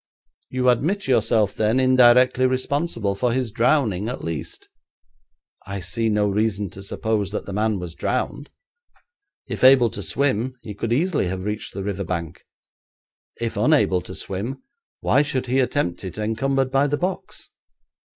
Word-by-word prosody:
'You 130 Hz, 0 st, -1 dB
admit 170 Hz, -, +1 dB
yourself, 110 Hz, -5 st, +2 dB
then, 110 Hz, +4 st, +1 dB
indirectly 130 Hz, 0 st, +5 dB
responsible 130 Hz, -4 st, -1 dB
for 120 Hz, +5 st, 0 dB
his 125 Hz, -3 st, -1 dB
drowning, 115 Hz, -5 st, +1 dB
at 125 Hz, -, -5 dB
least?' 80 Hz, -2 st, -6 dB, 1.0 s
'I 100 Hz, 0 st, -4 dB
see 105 Hz, +6 st, -1 dB
no 105 Hz, -1 st, +2 dB
reason 100 Hz, -2 st, -1 dB
to 95 Hz, -, -10 dB
suppose 105 Hz, 0 st, -2 dB
that 105 Hz, -, -4 dB
the 100 Hz, -, -6 dB
man 105 Hz, +1 st, 0 dB
was 90 Hz, -3 st, -6 dB
drowned. 145 Hz, -, -3 dB, 1.0 s
If -, -, -5 dB
able 130 Hz, -3 st, +7 dB
to 100 Hz, -, -6 dB
swim 130 Hz, +1 st, 0 dB
he 105 Hz, -, -7 dB
could 110 Hz, +3 st, -4 dB
easily 150 Hz, -, +1 dB
have 95 Hz, +1 st, -4 dB
reached 105 Hz, 0 st, -4 dB
the 100 Hz, -, -4 dB
river 100 Hz, -1 st, -3 dB
bank. 85 Hz, -4 st, -4 dB, 1.0 s
If 115 Hz, -1 st, -3 dB
unable 140 Hz, -, +3 dB
to 90 Hz, +1 st, -8 dB
swim, 105 Hz, -, -5 dB, 0.4 s
why -, -, +3 dB
should 135 Hz, -3 st, -1 dB
he 130 Hz, +2 st, +1 dB
attempt 130 Hz, -9 st, -1 dB
it 95 Hz, -1 st, -7 dB
encumbered 130 Hz, +5 st, 0 dB
by 135 Hz, +2 st, +3 dB
the 145 Hz, +1 st, -1 dB
box?' 185 Hz, +3 st, -5 dB
115 Hz, 155 wpm, -22 LUFS, 100-130 Hz, 1.0 s, able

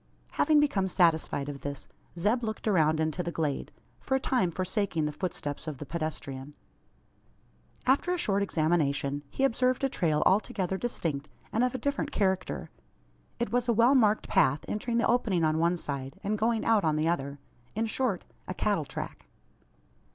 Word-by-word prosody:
Having 305 Hz, 0 st, +4 dB
become 210 Hz, -10 st, +2 dB
satisfied 160 Hz, -6 st, +2 dB
of 140 Hz, -1 st, -6 dB
this, 140 Hz, 0 st, -5 dB, 0.3 s
Zeb 215 Hz, +8 st, +1 dB
looked 220 Hz, 0 st, -3 dB
around 160 Hz, -6 st, +3 dB
into 160 Hz, +2 st, 0 dB
the 170 Hz, -, -3 dB
glade 155 Hz, -4 st, -2 dB, 0.3 s
for 265 Hz, -, -1 dB
a -, -, +2 dB
time 250 Hz, -8 st, +1 dB
forsaking 185 Hz, -2 st, -1 dB
the 150 Hz, -, -1 dB
footsteps 150 Hz, -3 st, -4 dB
of 150 Hz, -3 st, -4 dB
the 145 Hz, -, -7 dB
pedestrian. 145 Hz, -3 st, -5 dB, 1.3 s
After 275 Hz, +7 st, +3 dB
a 360 Hz, -, +1 dB
short 200 Hz, -, +1 dB
examination, 155 Hz, -5 st, +1 dB
he 270 Hz, -, -2 dB
observed 255 Hz, 0 st, +2 dB
a 270 Hz, -, +3 dB
trail 160 Hz, -, +1 dB
altogether 190 Hz, -2 st, +2 dB
distinct, 165 Hz, -10 st, -3 dB, 0.2 s
and 230 Hz, -, +2 dB
of 250 Hz, 0 st, +1 dB
a -, -, 0 dB
different 285 Hz, +3 st, -2 dB
character. 190 Hz, -6 st, -1 dB, 0.7 s
It 235 Hz, -3 st, -2 dB
was 245 Hz, 0 st, +1 dB
a 235 Hz, -, +4 dB
well 235 Hz, +4 st, +5 dB
marked 215 Hz, -5 st, +3 dB
path 140 Hz, +3 st, +3 dB
entering 230 Hz, +3 st, -1 dB
the 235 Hz, -, +3 dB
opening 215 Hz, -8 st, +2 dB
on 155 Hz, 0 st, +2 dB
one 170 Hz, +2 st, +2 dB
side, 140 Hz, -4 st, -5 dB
and 205 Hz, +2 st, 0 dB
going 225 Hz, +1 st, +1 dB
out 225 Hz, -3 st, +4 dB
on 155 Hz, -1 st, +2 dB
the 155 Hz, +1 st, +1 dB
other: 140 Hz, -4 st, -1 dB, 0.4 s
in 225 Hz, +2 st, +1 dB
short, 225 Hz, -4 st, -1 dB, 0.2 s
a 185 Hz, -, -4 dB
cattle 200 Hz, -7 st, 0 dB
track. -, -, -7 dB
185 Hz, 175 wpm, -29 LUFS, 155-230 Hz, 1.3 s, well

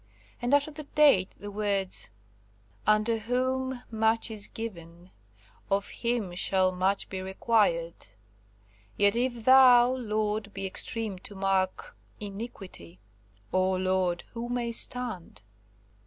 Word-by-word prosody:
And 245 Hz, +4 st, +3 dB
after 285 Hz, +2 st, +1 dB
the 300 Hz, 0 st, -9 dB
date 280 Hz, -12 st, +5 dB
the 205 Hz, 0 st, -8 dB
words, 200 Hz, -2 st, -1 dB, 0.8 s
"Unto 215 Hz, +2 st, +3 dB
whom 255 Hz, +2 st, -2 dB
much 225 Hz, +1 st, +1 dB
is 210 Hz, -2 st, -1 dB
given; 175 Hz, -5 st, -9 dB, 0.6 s
of 200 Hz, 0 st, 0 dB
him 235 Hz, -6 st, -2 dB
shall 185 Hz, +1 st, +2 dB
much 185 Hz, +2 st, 0 dB
be 190 Hz, -1 st, -5 dB
required; 190 Hz, -, 0 dB, 0.9 s
yet 205 Hz, +1 st, +4 dB
if 240 Hz, -2 st, -1 dB
Thou, 255 Hz, -2 st, +7 dB
Lord, 215 Hz, -4 st, -2 dB
be 195 Hz, 0 st, -3 dB
extreme 205 Hz, +1 st, 0 dB
to 200 Hz, -, -11 dB
mark 190 Hz, -1 st, -1 dB, 0.2 s
iniquity, 195 Hz, -, -8 dB, 0.5 s
O 185 Hz, 0 st, +2 dB
Lord, 185 Hz, -1 st, 0 dB
who 235 Hz, 0 st, -5 dB
may 240 Hz, -1 st, -2 dB
stand?" 230 Hz, -, 0 dB
210 Hz, 115 wpm, -28 LUFS, 190-240 Hz, 0.9 s, Thou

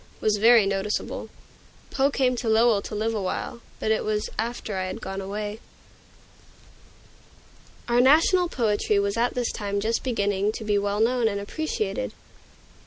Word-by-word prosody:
was 215 Hz, -1 st, +1 dB
very 225 Hz, 0 st, +6 dB
noticeable. 195 Hz, +1 st, -2 dB, 0.6 s
Poe 275 Hz, 0 st, +2 dB
came 255 Hz, -3 st, +1 dB
to 235 Hz, -, -2 dB
Lowell 220 Hz, -1 st, +4 dB
to 210 Hz, -, -7 dB
live 220 Hz, +2 st, -1 dB
awhile, 215 Hz, +3 st, -3 dB, 0.2 s
but 220 Hz, -, 0 dB
it 220 Hz, -, +1 dB
was 210 Hz, 0 st, -2 dB
after 225 Hz, -2 st, -3 dB
I 185 Hz, 0 st, -1 dB
had 185 Hz, -, -5 dB
gone 195 Hz, +1 st, -5 dB
away. 205 Hz, +2 st, -5 dB, 2.3 s
Our 240 Hz, 0 st, +4 dB
national 330 Hz, +7 st, +4 dB
poetry 210 Hz, -5 st, +1 dB
was 200 Hz, 0 st, 0 dB
at 235 Hz, +1 st, 0 dB
this 245 Hz, -2 st, -1 dB
time 200 Hz, -1 st, -3 dB
just 220 Hz, +3 st, -1 dB
beginning 205 Hz, -4 st, 0 dB
to 220 Hz, -, -6 dB
be 210 Hz, -1 st, +1 dB
well 205 Hz, +1 st, -1 dB
known 240 Hz, 0 st, +2 dB
and 200 Hz, -2 st, -1 dB
appreciated. 205 Hz, -, -3 dB
215 Hz, 155 wpm, -25 LUFS, 200-240 Hz, 2.3 s, very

